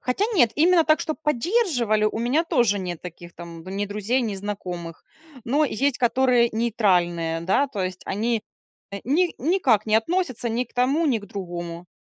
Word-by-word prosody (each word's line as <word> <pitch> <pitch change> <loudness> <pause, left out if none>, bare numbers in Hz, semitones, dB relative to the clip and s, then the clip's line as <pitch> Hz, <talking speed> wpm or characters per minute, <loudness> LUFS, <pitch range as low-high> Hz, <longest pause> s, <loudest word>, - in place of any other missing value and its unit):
хотя 255 +12 0
нет, 240 - +4
именно 335 +1 +4
так, 310 0 +3
чтоб 310 -2 -3
поддерживали, 280 - +1
у 215 - 0
меня 260 +8 +1
тоже 240 - +2
нет 175 -3 -5
таких 175 -1 -10
там 170 -1 -10
ни 195 +2 -3
друзей, 210 +5 -1
ни 215 -4 -2
знакомых. 180 -4 -6 0.4
Но 285 +6 +2
есть 275 0 0
которые 245 -1 +3
нейтральные, 180 -8 +1
да, 230 +11 +2
то 210 -7 -5
есть 185 0 -5
они, 225 +2 -1 0.5
э, 200 - -6
ни 335 +8 +1
никак 260 - +2
не 215 - +1
относятся 255 -2 -1
ни 235 +3 -1
к - - -27
тому, 275 +7 +2
ни 245 -6 +2
к 205 - -12
другому. 175 -3 -6
230 Hz, 175 wpm, -23 LUFS, 190-275 Hz, 0.5 s, нет